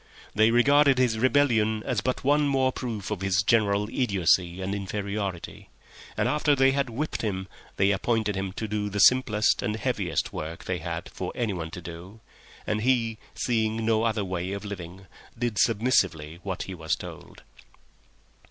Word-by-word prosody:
They 110 Hz, +1 st, +4 dB
regarded 140 Hz, +3 st, +5 dB
his 120 Hz, -4 st, +2 dB
rebellion 115 Hz, -5 st, +2 dB
as 125 Hz, -6 st, 0 dB
but 130 Hz, +3 st, -2 dB
one 145 Hz, +2 st, +3 dB
more 135 Hz, -2 st, +2 dB
proof 110 Hz, -7 st, -5 dB
of 100 Hz, -3 st, -3 dB
his 95 Hz, 0 st, +1 dB
general 105 Hz, -2 st, +2 dB
idiocy 95 Hz, -6 st, +1 dB
and 95 Hz, +1 st, -3 dB
inferiority, 100 Hz, -2 st, -4 dB, 0.5 s
and -, -, +1 dB
after 150 Hz, -1 st, +2 dB
they 135 Hz, 0 st, +4 dB
had 140 Hz, -1 st, 0 dB
whipped 140 Hz, +7 st, -3 dB
him 95 Hz, -4 st, -3 dB, 0.3 s
they 100 Hz, +1 st, +3 dB
appointed 105 Hz, +1 st, 0 dB
him 95 Hz, 0 st, -3 dB
to 110 Hz, -, -4 dB
do 105 Hz, 0 st, -2 dB
the 105 Hz, -, -5 dB
simplest 110 Hz, -2 st, +4 dB
and 105 Hz, +2 st, -1 dB
heaviest 110 Hz, -7 st, -2 dB
work 80 Hz, +2 st, -6 dB
they -, -, -3 dB
had -, -, -5 dB
for -, -, -5 dB
anyone 95 Hz, -9 st, -2 dB
to 90 Hz, -, -8 dB
do, 85 Hz, +5 st, -10 dB, 0.5 s
and 110 Hz, 0 st, -1 dB
he, 115 Hz, -2 st, +1 dB, 0.2 s
seeing 110 Hz, -2 st, 0 dB
no 110 Hz, -1 st, +2 dB
other 110 Hz, -3 st, 0 dB
way 90 Hz, 0 st, -3 dB
of 100 Hz, +1 st, -6 dB
living, 95 Hz, -1 st, -8 dB, 0.3 s
did 120 Hz, -3 st, -1 dB
submissively 95 Hz, -9 st, +1 dB
what 95 Hz, -2 st, -4 dB
he 95 Hz, -, -7 dB
was 80 Hz, -3 st, -1 dB
told. -, -, -11 dB
105 Hz, 165 wpm, -26 LUFS, 95-120 Hz, 0.5 s, regarded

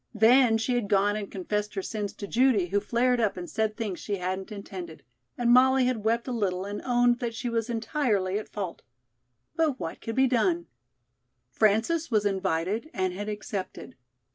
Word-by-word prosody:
Then 225 Hz, +1 st, +5 dB
she 225 Hz, +3 st, -1 dB
had 240 Hz, -4 st, 0 dB
gone 205 Hz, +1 st, +3 dB
and 210 Hz, -2 st, -4 dB
confessed 210 Hz, +2 st, -3 dB
her 195 Hz, -, -2 dB
sins 210 Hz, -2 st, -3 dB
to 205 Hz, -, -7 dB
Judy, 230 Hz, -6 st, +3 dB
who 200 Hz, +2 st, +2 dB
flared 240 Hz, +4 st, +1 dB
up 215 Hz, -4 st, +1 dB
and 175 Hz, -1 st, -5 dB
said 215 Hz, +2 st, -1 dB
things 210 Hz, -6 st, -3 dB
she 205 Hz, -, -3 dB
hadn't 190 Hz, +2 st, -4 dB
intended, 185 Hz, -5 st, -8 dB, 0.3 s
and 240 Hz, -1 st, +2 dB
Molly 260 Hz, +1 st, +5 dB
had 250 Hz, -4 st, -1 dB
wept 230 Hz, +3 st, 0 dB
a -, -, -2 dB
little 195 Hz, -5 st, -1 dB
and 205 Hz, +1 st, -5 dB
owned 245 Hz, -1 st, +3 dB
that 235 Hz, -2 st, -3 dB
she 240 Hz, -, -3 dB
was 230 Hz, 0 st, -1 dB
entirely 220 Hz, -5 st, 0 dB
at 215 Hz, -, -9 dB
fault. 195 Hz, -5 st, -5 dB, 0.7 s
But 310 Hz, -5 st, +1 dB
what 165 Hz, -, -5 dB
could 225 Hz, -, -5 dB
be 265 Hz, -, +4 dB
done? 200 Hz, -9 st, +1 dB, 0.9 s
Frances 225 Hz, -, +2 dB
was 215 Hz, -4 st, +2 dB
invited 190 Hz, -, -1 dB
and 185 Hz, -3 st, 0 dB
had 205 Hz, +3 st, -5 dB
accepted. 205 Hz, -2 st, -6 dB
215 Hz, 185 wpm, -27 LUFS, 195-240 Hz, 0.9 s, Then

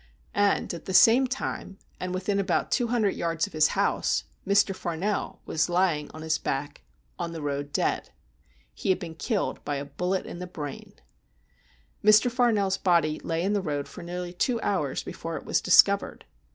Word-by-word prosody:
And 205 Hz, -2 st, +1 dB
at 170 Hz, -, -8 dB
the 190 Hz, -, -2 dB
same 245 Hz, +6 st, +7 dB
time, 245 Hz, -6 st, -4 dB, 0.2 s
and 185 Hz, 0 st, -3 dB
within 190 Hz, +2 st, -1 dB
about 195 Hz, -2 st, 0 dB
two 245 Hz, -, +2 dB
hundred 225 Hz, -4 st, +2 dB
yards 165 Hz, -1 st, -1 dB
of -, -, -12 dB
his 155 Hz, -1 st, +4 dB
house, -, -, +1 dB, 0.2 s
Mr. 200 Hz, -1 st, +3 dB
Farnell 185 Hz, +4 st, -3 dB
was 155 Hz, +2 st, 0 dB
lying 175 Hz, -4 st, +1 dB
on 155 Hz, -, -9 dB
his 160 Hz, -1 st, 0 dB
back 135 Hz, -, -3 dB, 0.4 s
on 170 Hz, 0 st, -3 dB
the 165 Hz, -, -6 dB
road 145 Hz, 0 st, -3 dB
dead. -, -, 0 dB, 0.6 s
He -, -, -4 dB
had 185 Hz, -, +4 dB
been 175 Hz, -3 st, -7 dB
killed 205 Hz, +6 st, -2 dB
by 145 Hz, -, -2 dB
a 140 Hz, 0 st, -4 dB
bullet 180 Hz, +6 st, -2 dB
in 175 Hz, -, -8 dB
the 180 Hz, -, -5 dB
brain. 150 Hz, -6 st, -7 dB, 1.1 s
Mr. 215 Hz, +4 st, +6 dB
Farnell's 215 Hz, -6 st, +2 dB
body 165 Hz, -4 st, +2 dB
lay 165 Hz, 0 st, -1 dB
in 200 Hz, +2 st, +1 dB
the 205 Hz, -, +1 dB
road 145 Hz, -5 st, -3 dB
for -, -, -10 dB
nearly 175 Hz, 0 st, -5 dB
two 235 Hz, +6 st, 0 dB
hours 165 Hz, -10 st, -1 dB
before -, -, -5 dB
it -, -, -9 dB
was -, -, +1 dB
discovered. -, -, +4 dB
180 Hz, 180 wpm, -27 LUFS, 160-200 Hz, 1.1 s, same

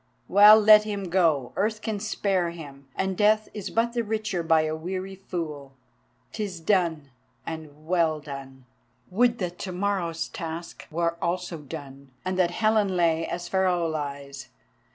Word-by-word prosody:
Well, 210 Hz, +3 st, +8 dB
let 210 Hz, 0 st, +8 dB
him 200 Hz, -3 st, -4 dB
go! 160 Hz, -9 st, +2 dB
Earth 215 Hz, +1 st, 0 dB
can 215 Hz, -2 st, -2 dB
spare 195 Hz, -4 st, 0 dB
him, 140 Hz, -5 st, -10 dB
and 190 Hz, 0 st, -1 dB
Death 215 Hz, +2 st, +3 dB
is 205 Hz, -2 st, -5 dB
but 235 Hz, +1 st, 0 dB
the 235 Hz, -1 st, 0 dB
richer 215 Hz, -4 st, -2 dB
by 160 Hz, -1 st, +3 dB
a 155 Hz, 0 st, -2 dB
weary 185 Hz, +4 st, -5 dB
fool. 160 Hz, -7 st, -6 dB, 0.6 s
'Tis 200 Hz, -5 st, -4 dB
done, 160 Hz, -5 st, 0 dB, 0.3 s
and 155 Hz, -2 st, -8 dB
well 165 Hz, -2 st, +1 dB
done! 135 Hz, -3 st, -9 dB, 0.5 s
Would 240 Hz, +4 st, +3 dB
that 180 Hz, -3 st, -4 dB
to 190 Hz, -, -4 dB
morrow's 180 Hz, -3 st, -1 dB
task 165 Hz, +1 st, -7 dB
were 170 Hz, +1 st, -1 dB
also 175 Hz, -1 st, -2 dB
done—and 140 Hz, +3 st, -7 dB
that 175 Hz, -2 st, +4 dB
Helen 210 Hz, 0 st, +1 dB
lay 165 Hz, -1 st, +2 dB
as 175 Hz, 0 st, -4 dB
Pharaoh 185 Hz, -3 st, +1 dB
lies. 140 Hz, -3 st, -5 dB
175 Hz, 150 wpm, -26 LUFS, 155-200 Hz, 0.6 s, Well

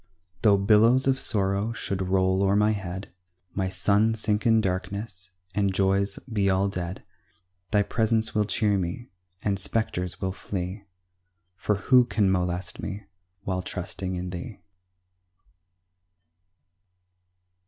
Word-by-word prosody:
Tho' 105 Hz, -3 st, +5 dB
billows 110 Hz, +6 st, +5 dB
of 135 Hz, 0 st, +2 dB
sorrow 100 Hz, +2 st, 0 dB
should 100 Hz, -4 st, -3 dB
roll 95 Hz, 0 st, +2 dB
o'er 100 Hz, 0 st, +3 dB
my 105 Hz, +1 st, +4 dB
head, 95 Hz, -2 st, -5 dB, 0.4 s
My 95 Hz, -1 st, -1 dB
sun 100 Hz, +4 st, +2 dB
sink 105 Hz, 0 st, +1 dB
in 115 Hz, -1 st, +5 dB
darkness, 95 Hz, -1 st, -3 dB, 0.2 s
and 100 Hz, 0 st, +1 dB
joys 100 Hz, +1 st, +1 dB
be 105 Hz, -6 st, 0 dB
all 95 Hz, +1 st, +2 dB
dead, 90 Hz, -1 st, -5 dB, 0.7 s
Thy 105 Hz, -1 st, +3 dB
presence 110 Hz, 0 st, +1 dB
will 105 Hz, -1 st, +2 dB
cheer 105 Hz, -1 st, +1 dB
me, 90 Hz, +8 st, -4 dB, 0.3 s
and 100 Hz, -2 st, 0 dB
spectres 90 Hz, -3 st, -1 dB
will 95 Hz, -1 st, -1 dB
flee, 95 Hz, +1 st, -5 dB, 0.7 s
For 105 Hz, +3 st, 0 dB
who 125 Hz, +5 st, +4 dB
can 105 Hz, -5 st, +2 dB
molest 90 Hz, -1 st, -1 dB
me 100 Hz, +2 st, -5 dB, 0.4 s
while 95 Hz, -1 st, -1 dB
trusting 90 Hz, 0 st, -4 dB
in 90 Hz, 0 st, -4 dB
thee? 95 Hz, +5 st, -7 dB
100 Hz, 125 wpm, -26 LUFS, 95-105 Hz, 0.7 s, Tho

